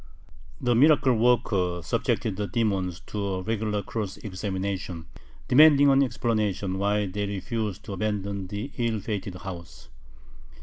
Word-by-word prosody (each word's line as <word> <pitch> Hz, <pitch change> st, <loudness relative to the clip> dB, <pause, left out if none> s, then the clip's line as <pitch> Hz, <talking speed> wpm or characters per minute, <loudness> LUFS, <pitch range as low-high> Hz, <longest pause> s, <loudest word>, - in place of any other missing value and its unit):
The 125 Hz, -1 st, +1 dB
miracle 140 Hz, +1 st, +5 dB
worker 105 Hz, -7 st, +2 dB
subjected 105 Hz, -, -1 dB
the 105 Hz, +1 st, -3 dB
demons 95 Hz, -7 st, -1 dB
to 105 Hz, -1 st, -5 dB
a 95 Hz, -2 st, -2 dB
regular 105 Hz, 0 st, -1 dB
cross 105 Hz, -2 st, -4 dB
examination, 95 Hz, -3 st, -4 dB, 0.4 s
demanding 145 Hz, +1 st, +7 dB
an 135 Hz, 0 st, +5 dB
explanation 105 Hz, -6 st, -1 dB
why 105 Hz, +1 st, +1 dB
they 100 Hz, +2 st, -3 dB
refused 100 Hz, 0 st, -3 dB
to 100 Hz, -, -6 dB
abandon 100 Hz, -1 st, -2 dB
the 105 Hz, +8 st, -5 dB
ill 115 Hz, -2 st, 0 dB
fated 100 Hz, -2 st, -4 dB
house. 90 Hz, -3 st, -9 dB
105 Hz, 130 wpm, -26 LUFS, 95-115 Hz, 0.4 s, demanding